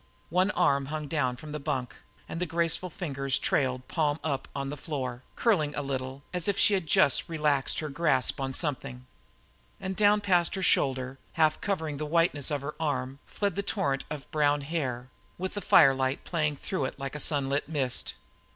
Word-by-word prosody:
One 185 Hz, +3 st, +3 dB
arm 140 Hz, -6 st, +3 dB
hung 155 Hz, 0 st, -4 dB
down 140 Hz, -5 st, 0 dB
from 150 Hz, +4 st, -10 dB
the 150 Hz, -, -4 dB
bunk 135 Hz, -4 st, -3 dB, 0.3 s
and 165 Hz, -, -5 dB
the 180 Hz, -, 0 dB
graceful 170 Hz, +2 st, +1 dB
fingers 140 Hz, -6 st, -1 dB
trailed, 130 Hz, -2 st, 0 dB
palm 155 Hz, -2 st, 0 dB
up, 140 Hz, -4 st, -2 dB
on 140 Hz, 0 st, -3 dB
the -, -, -4 dB
floor, 130 Hz, -4 st, -4 dB
curling 160 Hz, -11 st, +2 dB
a 145 Hz, -, -2 dB
little, 135 Hz, 0 st, -4 dB
as 180 Hz, -2 st, -1 dB
if 200 Hz, -1 st, +1 dB
she 210 Hz, -, +5 dB
had 185 Hz, -5 st, 0 dB
just 140 Hz, +3 st, +3 dB
relaxed 150 Hz, -4 st, +1 dB
her 155 Hz, -, -4 dB
grasp 140 Hz, -3 st, +1 dB
on 135 Hz, 0 st, -1 dB
something. 135 Hz, -3 st, -1 dB, 0.7 s
And 190 Hz, 0 st, -4 dB
down 210 Hz, 0 st, +5 dB
past 180 Hz, -4 st, +2 dB
her 190 Hz, -, -3 dB
shoulder, 130 Hz, -4 st, +1 dB
half 155 Hz, -2 st, +2 dB
covering 160 Hz, -7 st, -2 dB
the 150 Hz, +1 st, -3 dB
whiteness 165 Hz, -3 st, +2 dB
of 145 Hz, -3 st, -1 dB
her 145 Hz, +2 st, -5 dB
arm, 135 Hz, -3 st, -2 dB
fled 200 Hz, -4 st, -1 dB
the 200 Hz, -, 0 dB
torrent 140 Hz, -10 st, -1 dB
of 150 Hz, -2 st, -7 dB
brown 145 Hz, -1 st, +2 dB
hair, 130 Hz, -5 st, -3 dB, 0.3 s
with 185 Hz, +1 st, -3 dB
the 205 Hz, -, -4 dB
firelight 135 Hz, -5 st, +4 dB
playing 155 Hz, -4 st, 0 dB
through 145 Hz, 0 st, -2 dB
it -, -, -5 dB
like 135 Hz, -1 st, -5 dB
a 150 Hz, -, -5 dB
sunlit 140 Hz, -1 st, +1 dB
mist. 135 Hz, -6 st, 0 dB
145 Hz, 190 wpm, -28 LUFS, 135-165 Hz, 0.7 s, she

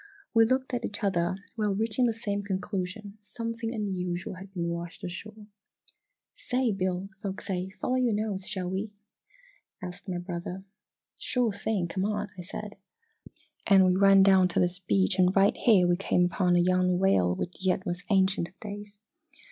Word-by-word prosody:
"We 225 Hz, -1 st, +6 dB
looked 260 Hz, +2 st, 0 dB
at 240 Hz, -1 st, -1 dB
each 205 Hz, -, -4 dB
other, 175 Hz, -2 st, +1 dB, 0.2 s
while 210 Hz, -3 st, 0 dB
reaching 225 Hz, +4 st, +1 dB
the 230 Hz, -, +1 dB
same 205 Hz, -3 st, -2 dB
conclusion 200 Hz, +1 st, -4 dB
something 230 Hz, +1 st, -4 dB
unusual 185 Hz, -6 st, -3 dB
had 190 Hz, +1 st, -11 dB
been 175 Hz, -3 st, -3 dB
washed 170 Hz, 0 st, -5 dB
ashore! 210 Hz, +4 st, -6 dB, 0.9 s
"Say, 250 Hz, -2 st, 0 dB
Bill, 185 Hz, -1 st, -2 dB
folks 195 Hz, 0 st, -5 dB
say 185 Hz, -2 st, -2 dB
'follow 250 Hz, +6 st, -2 dB
your 245 Hz, -4 st, +2 dB
nose' 205 Hz, -3 st, -2 dB
shall 185 Hz, -3 st, -2 dB
we?" 205 Hz, +2 st, -4 dB, 0.8 s
asked 180 Hz, +1 st, -8 dB
my 180 Hz, -, -2 dB
brother. 175 Hz, +1 st, -5 dB, 0.6 s
"Sure 245 Hz, -3 st, +1 dB
thing 200 Hz, -3 st, -1 dB
come 185 Hz, +3 st, -2 dB
on!" 210 Hz, -1 st, -2 dB
said 205 Hz, +4 st, -7 dB
I, 450 Hz, -, -24 dB, 0.4 s
and 195 Hz, -2 st, +7 dB
we 185 Hz, -, +4 dB
ran 195 Hz, 0 st, +6 dB
down 190 Hz, -1 st, +6 dB
to 175 Hz, -, 0 dB
this 180 Hz, 0 st, +1 dB
beach 190 Hz, +1 st, +1 dB
and 185 Hz, +1 st, +4 dB
right 195 Hz, +1 st, +4 dB
here 195 Hz, -7 st, +4 dB
we 175 Hz, 0 st, +2 dB
came 180 Hz, -2 st, +2 dB
upon 180 Hz, 0 st, +2 dB
a -, -, +5 dB
young 180 Hz, 0 st, +3 dB
whale 95 Hz, -, +3 dB
which 180 Hz, -, -5 dB
yet 185 Hz, 0 st, +1 dB
was 175 Hz, +1 st, -3 dB
ancient 190 Hz, -3 st, +3 dB
of 185 Hz, -, -24 dB
days! 205 Hz, -1 st, -7 dB
195 Hz, 170 wpm, -28 LUFS, 180-210 Hz, 0.9 s, and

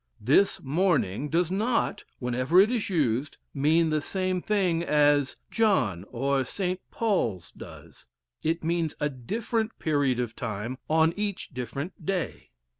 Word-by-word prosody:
"This 145 Hz, -, +3 dB
morning" 145 Hz, -, +1 dB
does 170 Hz, +2 st, +1 dB
not, 225 Hz, +5 st, 0 dB
whenever 130 Hz, +7 st, +2 dB
it 205 Hz, +4 st, +6 dB
is 235 Hz, -5 st, -1 dB
used, 140 Hz, -, 0 dB, 0.2 s
mean 160 Hz, +3 st, +3 dB
the 155 Hz, -1 st, +1 dB
same 185 Hz, +2 st, -1 dB
thing, 185 Hz, -6 st, +1 dB
as 145 Hz, -3 st, +3 dB, 0.2 s
"John" 125 Hz, -, +2 dB
or 135 Hz, +2 st, 0 dB
"St. 185 Hz, +6 st, -2 dB
Paul's" 150 Hz, -, -1 dB
does; -, -, -13 dB, 0.3 s
it 165 Hz, +1 st, -1 dB
means 165 Hz, -1 st, 0 dB
a 150 Hz, -, +1 dB
different 220 Hz, -, -3 dB
period 145 Hz, -5 st, +1 dB
of 120 Hz, -2 st, -3 dB
time 115 Hz, +5 st, -4 dB
on 160 Hz, +1 st, +4 dB
each 205 Hz, -2 st, -3 dB
different 135 Hz, -, -6 dB
day. 190 Hz, -4 st, -3 dB
155 Hz, 135 wpm, -27 LUFS, 130-185 Hz, 0.3 s, it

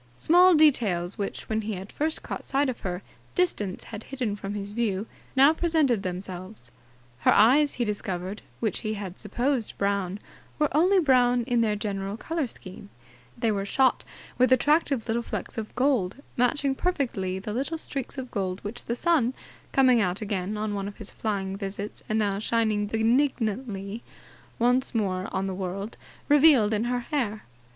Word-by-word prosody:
Small 355 Hz, -, +6 dB
details 210 Hz, -, +3 dB
which, 200 Hz, -, -4 dB
when 220 Hz, 0 st, 0 dB
he 215 Hz, 0 st, -3 dB
had 190 Hz, +1 st, -7 dB
first 315 Hz, +2 st, -2 dB
caught -, -, -5 dB
sight 275 Hz, +1 st, +1 dB
of 255 Hz, -, -4 dB
her, 180 Hz, 0 st, -4 dB, 0.3 s
distance 215 Hz, -, 0 dB
had 220 Hz, -1 st, -8 dB
hidden 250 Hz, -6 st, -3 dB
from 200 Hz, 0 st, -5 dB
his 205 Hz, 0 st, -5 dB
view, 210 Hz, -3 st, -1 dB, 0.3 s
now 275 Hz, +4 st, +7 dB
presented 315 Hz, -, +2 dB
themselves. 185 Hz, +2 st, -6 dB, 0.5 s
Her -, -, +4 dB
eyes, 275 Hz, +7 st, +5 dB
he 240 Hz, -, 0 dB
discovered, 195 Hz, -2 st, -4 dB, 0.2 s
which 220 Hz, -3 st, -1 dB
he 215 Hz, -1 st, -3 dB
had 195 Hz, -3 st, -7 dB
supposed 240 Hz, +3 st, -1 dB
brown, 200 Hz, -1 st, 0 dB, 0.4 s
were 300 Hz, -2 st, +1 dB
only 365 Hz, +6 st, +5 dB
brown 250 Hz, -6 st, +4 dB
in 240 Hz, 0 st, +1 dB
their 215 Hz, -2 st, +2 dB
general 200 Hz, -1 st, -3 dB
colour 320 Hz, +1 st, -2 dB
scheme. 200 Hz, -1 st, -10 dB, 0.5 s
They 230 Hz, -1 st, +1 dB
were 200 Hz, -2 st, -1 dB
shot 260 Hz, +6 st, +2 dB, 0.4 s
with 255 Hz, +1 st, +4 dB
attractive 280 Hz, -2 st, +3 dB
little 230 Hz, +1 st, 0 dB
flecks -, -, -5 dB
of 215 Hz, -, -7 dB
gold, 250 Hz, -8 st, +1 dB, 0.2 s
matching 270 Hz, +3 st, +2 dB
perfectly 245 Hz, -, -1 dB
the 205 Hz, +2 st, -5 dB
little 275 Hz, +7 st, -1 dB
streaks 275 Hz, -4 st, -5 dB
of 260 Hz, -2 st, -6 dB
gold 190 Hz, -2 st, -2 dB
which 215 Hz, +4 st, -5 dB
the 235 Hz, -, -1 dB
sun, 260 Hz, -5 st, +2 dB, 0.4 s
coming 255 Hz, -3 st, +5 dB
out 185 Hz, -1 st, 0 dB
again 205 Hz, -1 st, -3 dB
on 210 Hz, 0 st, -2 dB
one 200 Hz, -1 st, -3 dB
of 200 Hz, -, -8 dB
his 215 Hz, -, -5 dB
flying 195 Hz, -3 st, -2 dB
visits 200 Hz, +1 st, -5 dB
and 215 Hz, -, +1 dB
now 200 Hz, -2 st, +1 dB
shining 215 Hz, -2 st, +1 dB
benignantly 225 Hz, -2 st, 0 dB, 0.6 s
once 250 Hz, +2 st, +2 dB
more 190 Hz, -4 st, 0 dB
on 190 Hz, 0 st, -1 dB
the 190 Hz, -, -2 dB
world, 195 Hz, +3 st, -4 dB, 0.3 s
revealed 285 Hz, -7 st, +6 dB
in 215 Hz, +2 st, 0 dB
her 245 Hz, 0 st, 0 dB
hair. 235 Hz, -5 st, -2 dB
220 Hz, 170 wpm, -26 LUFS, 200-260 Hz, 0.6 s, now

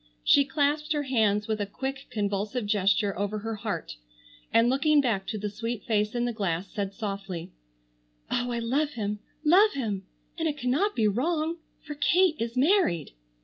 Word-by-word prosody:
She 280 Hz, -, +5 dB
clasped 295 Hz, +2 st, 0 dB
her 295 Hz, -1 st, 0 dB
hands 215 Hz, -6 st, +1 dB
with 215 Hz, -1 st, -1 dB
a 205 Hz, -, -1 dB
quick, 270 Hz, +6 st, -5 dB
convulsive 205 Hz, +2 st, -2 dB
gesture 200 Hz, 0 st, +2 dB
over 205 Hz, +1 st, -1 dB
her 225 Hz, +1 st, -4 dB
heart 200 Hz, -, -4 dB, 0.5 s
and 230 Hz, +1 st, +5 dB
looking 290 Hz, +4 st, +3 dB
back 215 Hz, -8 st, 0 dB
to 215 Hz, +2 st, -3 dB
the 210 Hz, 0 st, -3 dB
sweet 230 Hz, +2 st, -4 dB
face 210 Hz, 0 st, 0 dB
in 240 Hz, 0 st, +1 dB
the 240 Hz, -, -1 dB
glass, 190 Hz, -4 st, -2 dB
said 200 Hz, -3 st, -3 dB
softly, 195 Hz, -6 st, -5 dB, 0.8 s
"Oh, 245 Hz, 0 st, 0 dB
I 235 Hz, -, -1 dB
love 275 Hz, +6 st, 0 dB
him, 210 Hz, -2 st, -3 dB, 0.3 s
love 395 Hz, +7 st, +6 dB
him! 205 Hz, -8 st, -3 dB, 0.3 s
And 325 Hz, -, +1 dB
it 295 Hz, -1 st, -2 dB
cannot 290 Hz, +11 st, +1 dB
be 220 Hz, -2 st, +3 dB
wrong, 315 Hz, -, 0 dB, 0.3 s
for 295 Hz, -, -6 dB
Kate 340 Hz, +3 st, +3 dB
is 230 Hz, +2 st, -3 dB
married." 270 Hz, -, +2 dB
230 Hz, 175 wpm, -27 LUFS, 205-285 Hz, 0.8 s, love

